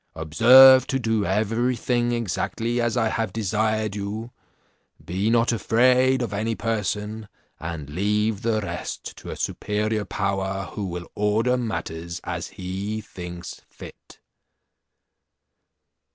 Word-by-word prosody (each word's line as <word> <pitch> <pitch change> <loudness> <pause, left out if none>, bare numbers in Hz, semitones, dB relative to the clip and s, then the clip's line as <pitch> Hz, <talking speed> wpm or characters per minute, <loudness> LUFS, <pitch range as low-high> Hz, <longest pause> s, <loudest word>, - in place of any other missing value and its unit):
Observe 125 - +7
to 135 - 0
do 110 -4 0
everything 120 +4 0
exactly 115 +1 -1
as 120 +1 0
I 110 -2 +2
have 115 0 -2
desired 110 0 -1
you; 105 +3 -5 0.7
be 95 +5 -1
not 115 +1 +3
afraid 125 +3 +3
of 110 -4 -4
any 110 +3 -1
person, 105 -1 -3 0.3
and 80 -3 -5
leave 105 +6 0
the 110 -2 0
rest 100 - -6
to - - -10
a - - -5
superior 105 +1 -2
power, 95 0 -2
who 100 -2 -4
will 90 -1 -5
order 110 +4 +1
matters 85 -8 -4
as - - -4
he 95 +4 -5
thinks 90 -6 -8
fit." - - -13
110 Hz, 120 wpm, -24 LUFS, 95-115 Hz, 0.7 s, Observe